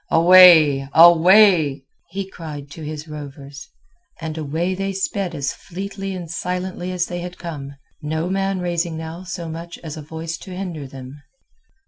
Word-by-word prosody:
"Away, 165 Hz, -5 st, +7 dB
away!" 170 Hz, -3 st, +6 dB, 0.3 s
he 195 Hz, 0 st, -5 dB
cried 150 Hz, -6 st, -9 dB
to 160 Hz, -, -10 dB
his 155 Hz, 0 st, -6 dB
rovers, 140 Hz, -2 st, -9 dB, 0.5 s
and 160 Hz, -2 st, -5 dB
away 160 Hz, +4 st, -2 dB
they 195 Hz, +1 st, -3 dB
sped 190 Hz, -2 st, -2 dB
as 140 Hz, -2 st, -2 dB
fleetly 195 Hz, +1 st, -6 dB
and 175 Hz, -2 st, -6 dB
silently 180 Hz, +2 st, -4 dB
as 180 Hz, -1 st, -1 dB
they 175 Hz, 0 st, -5 dB
had 180 Hz, +1 st, -7 dB
come, 145 Hz, -5 st, -7 dB, 0.3 s
no 160 Hz, +2 st, -2 dB
man 195 Hz, 0 st, -1 dB
raising 170 Hz, -2 st, -2 dB
now 160 Hz, +2 st, -7 dB
so 180 Hz, -2 st, -6 dB
much 165 Hz, +1 st, -7 dB
as 160 Hz, -1 st, -7 dB
a -, -, -6 dB
voice 160 Hz, +2 st, -6 dB
to 185 Hz, -2 st, -9 dB
hinder 170 Hz, -7 st, -5 dB
them. 130 Hz, +2 st, -11 dB
170 Hz, 155 wpm, -21 LUFS, 150-185 Hz, 0.5 s, Away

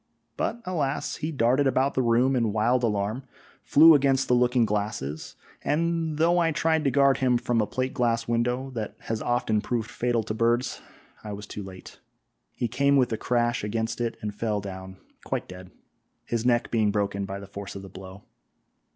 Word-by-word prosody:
but, 235 Hz, -, -2 dB
alas! 150 Hz, -7 st, -2 dB
he 155 Hz, +1 st, -3 dB
darted 130 Hz, +1 st, +2 dB
about 135 Hz, +1 st, +1 dB
the 130 Hz, -, +1 dB
room 125 Hz, +2 st, +3 dB
in 115 Hz, -4 st, +1 dB
wild 115 Hz, +4 st, +2 dB
alarm, 105 Hz, +2 st, -1 dB, 0.4 s
flew 160 Hz, +3 st, +7 dB
against 135 Hz, -2 st, +3 dB
the -, -, +2 dB
looking 125 Hz, -1 st, +3 dB
glasses, 100 Hz, -9 st, -3 dB, 0.3 s
and 165 Hz, 0 st, 0 dB
though 170 Hz, +2 st, +3 dB
I 165 Hz, -1 st, +2 dB
tried 160 Hz, 0 st, +1 dB
to -, -, +4 dB
guard 140 Hz, 0 st, +4 dB
him 125 Hz, -2 st, +2 dB
from 120 Hz, -1 st, 0 dB
a 105 Hz, -, -1 dB
plate 130 Hz, 0 st, -2 dB
glass 115 Hz, -4 st, 0 dB
window, 125 Hz, +3 st, -1 dB
that 110 Hz, -4 st, -5 dB
has 110 Hz, -1 st, -3 dB
often 115 Hz, -3 st, 0 dB
proved 115 Hz, -2 st, -3 dB
fatal 120 Hz, -2 st, 0 dB
to 110 Hz, -, -4 dB
birds, 120 Hz, +3 st, 0 dB, 0.4 s
I 105 Hz, -, -6 dB
was 100 Hz, +1 st, -7 dB
too 105 Hz, -, -7 dB
late; 95 Hz, -1 st, -11 dB, 0.5 s
he 120 Hz, -, -2 dB
came 140 Hz, +4 st, +2 dB
with 125 Hz, -3 st, +2 dB
a -, -, -1 dB
crash 120 Hz, -1 st, 0 dB
against 115 Hz, +2 st, -2 dB
it 115 Hz, -1 st, -2 dB
and 105 Hz, -1 st, -3 dB
fell 105 Hz, 0 st, -1 dB
down 95 Hz, -1 st, -8 dB, 0.3 s
quite -, -, -3 dB
dead, 90 Hz, 0 st, -11 dB, 0.6 s
his 115 Hz, +1 st, -1 dB
neck 120 Hz, -1 st, +2 dB
being 110 Hz, -3 st, +2 dB
broken 100 Hz, -1 st, -1 dB
by 95 Hz, +1 st, -6 dB
the 100 Hz, -, -9 dB
force 100 Hz, 0 st, -8 dB
of 100 Hz, -, -7 dB
the -, -, -9 dB
blow. 95 Hz, +1 st, -11 dB
120 Hz, 190 wpm, -26 LUFS, 105-130 Hz, 0.6 s, flew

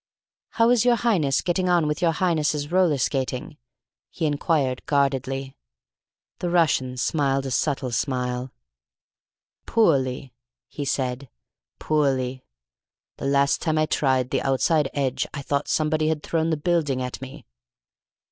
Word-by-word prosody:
"How 230 Hz, +1 st, +5 dB
is 245 Hz, -3 st, +4 dB
your 245 Hz, -1 st, +4 dB
Highness 180 Hz, -, +1 dB
getting 180 Hz, +1 st, 0 dB
on 175 Hz, -3 st, +3 dB
with 150 Hz, +3 st, -2 dB
your 170 Hz, -2 st, +3 dB
Highness's 155 Hz, -4 st, 0 dB
roller 180 Hz, -5 st, +3 dB
skating?" 135 Hz, +3 st, -2 dB, 0.5 s
he 165 Hz, -, -3 dB
enquired 145 Hz, -3 st, 0 dB
guardedly. 135 Hz, -1 st, 0 dB, 0.8 s
The 175 Hz, -, -2 dB
Russian 145 Hz, -7 st, +1 dB
smiled 135 Hz, 0 st, 0 dB
a 135 Hz, -, -4 dB
subtle 135 Hz, -1 st, -1 dB
smile. 125 Hz, 0 st, -2 dB, 1.2 s
"Poorly," 135 Hz, -, +1 dB, 0.3 s
he 145 Hz, -, -6 dB
said, 130 Hz, -1 st, -2 dB, 0.5 s
"poorly. 135 Hz, -4 st, 0 dB, 0.7 s
The -, -, -3 dB
last 140 Hz, 0 st, +2 dB
time 155 Hz, -2 st, 0 dB
I 155 Hz, -, +3 dB
tried 130 Hz, -4 st, +1 dB
the -, -, 0 dB
outside 140 Hz, +2 st, +1 dB
edge 135 Hz, -3 st, -1 dB
I 140 Hz, -, -5 dB
thought 140 Hz, +1 st, -1 dB
somebody 155 Hz, 0 st, +1 dB
had 155 Hz, -1 st, -1 dB
thrown 165 Hz, -1 st, 0 dB
the 160 Hz, -, 0 dB
building 150 Hz, -4 st, 0 dB
at 125 Hz, +1 st, -6 dB
me." 135 Hz, -1 st, -10 dB
145 Hz, 135 wpm, -24 LUFS, 130-160 Hz, 1.2 s, How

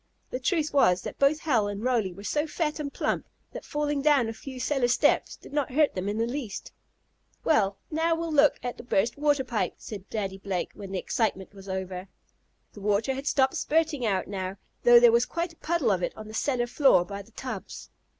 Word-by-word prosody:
The 255 Hz, -, -2 dB
truth 310 Hz, +3 st, 0 dB
was 185 Hz, -10 st, +4 dB
that -, -, -7 dB
both 280 Hz, +3 st, +3 dB
Hal 235 Hz, -9 st, +2 dB
and 205 Hz, +1 st, -5 dB
Roly 235 Hz, -7 st, +1 dB
were 195 Hz, +3 st, -11 dB
so 295 Hz, +8 st, 0 dB
fat 305 Hz, 0 st, -2 dB
and 285 Hz, -2 st, -3 dB
plump, -, -, -2 dB, 0.2 s
that -, -, -7 dB
falling 295 Hz, -1 st, -1 dB
down 280 Hz, -5 st, +4 dB
a 225 Hz, -, -3 dB
few 260 Hz, +3 st, -9 dB
cellar 255 Hz, 0 st, +1 dB
steps 245 Hz, -, +2 dB
did -, -, -15 dB
not 285 Hz, -3 st, -1 dB
hurt 300 Hz, +1 st, +3 dB
them 190 Hz, +2 st, -2 dB
in 210 Hz, -, -2 dB
the 225 Hz, -, +1 dB
least. 240 Hz, -4 st, -5 dB, 0.7 s
"Well, 200 Hz, -10 st, +2 dB
now 325 Hz, +2 st, +2 dB
we'll 330 Hz, 0 st, -3 dB
look 295 Hz, 0 st, +5 dB
at 245 Hz, -1 st, -4 dB
the -, -, -9 dB
burst 230 Hz, -1 st, +1 dB
water 290 Hz, -2 st, +2 dB
pipe," 240 Hz, -4 st, -2 dB
said 200 Hz, -3 st, -9 dB
Daddy 195 Hz, -3 st, -3 dB
Blake, 190 Hz, -2 st, -3 dB
when 195 Hz, -1 st, -9 dB
the 195 Hz, -, -2 dB
excitement 195 Hz, -1 st, -1 dB
was 195 Hz, -1 st, -12 dB
over. 190 Hz, 0 st, -4 dB, 0.7 s
The 205 Hz, -, -11 dB
water 210 Hz, +5 st, +1 dB
had 270 Hz, +2 st, -6 dB
stopped 265 Hz, -2 st, +2 dB
spurting 315 Hz, -4 st, +1 dB
out 195 Hz, -4 st, 0 dB
now, 190 Hz, -1 st, -4 dB, 0.2 s
though 240 Hz, 0 st, +8 dB
there 240 Hz, -1 st, +7 dB
was 235 Hz, +1 st, +3 dB
quite 340 Hz, 0 st, -3 dB
a -, -, -25 dB
puddle 320 Hz, -9 st, +1 dB
of 185 Hz, -2 st, +1 dB
it -, -, -3 dB
on 215 Hz, -, -8 dB
the 215 Hz, -, -10 dB
cellar 245 Hz, +1 st, 0 dB
floor 240 Hz, -, +4 dB
by 200 Hz, +1 st, -6 dB
the 215 Hz, +3 st, -18 dB
tubs. 255 Hz, +2 st, -7 dB
240 Hz, 220 wpm, -27 LUFS, 200-290 Hz, 0.7 s, though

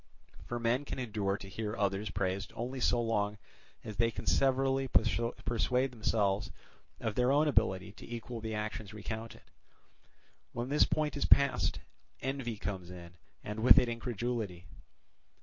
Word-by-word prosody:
For 120 Hz, -, -3 dB
men 120 Hz, +4 st, +1 dB
can -, -, -5 dB
endure 105 Hz, -5 st, -1 dB
to 100 Hz, -, -10 dB
hear 105 Hz, +3 st, -4 dB
others 100 Hz, 0 st, 0 dB
praised 95 Hz, +1 st, -2 dB
only 125 Hz, +3 st, -4 dB
so 120 Hz, -1 st, +3 dB
long 105 Hz, -3 st, 0 dB, 0.5 s
as 105 Hz, -2 st, -7 dB
they 115 Hz, 0 st, +3 dB
can 115 Hz, -, -7 dB
severally 135 Hz, 0 st, +2 dB
persuade 120 Hz, +2 st, +1 dB
themselves 105 Hz, -4 st, +1 dB, 0.5 s
of 110 Hz, -, -2 dB
their 125 Hz, +3 st, +3 dB
own 150 Hz, +2 st, +4 dB
ability 105 Hz, -7 st, +1 dB
to 110 Hz, -, -12 dB
equal 120 Hz, 0 st, -5 dB
the 110 Hz, -1 st, -3 dB
actions 105 Hz, 0 st, -4 dB
recounted: 110 Hz, +2 st, -6 dB, 1.1 s
when 120 Hz, +2 st, -3 dB
this 145 Hz, +2 st, +5 dB
point 150 Hz, -2 st, 0 dB
is 145 Hz, -, 0 dB
passed, 140 Hz, -1 st, +4 dB, 0.4 s
envy 130 Hz, -4 st, -3 dB
comes 95 Hz, -4 st, -4 dB
in 85 Hz, -1 st, -10 dB, 0.3 s
and 105 Hz, +1 st, -5 dB
with 120 Hz, +3 st, +8 dB
it 125 Hz, -, +5 dB
incredulity. 115 Hz, -5 st, -3 dB
115 Hz, 150 wpm, -32 LUFS, 105-125 Hz, 1.1 s, with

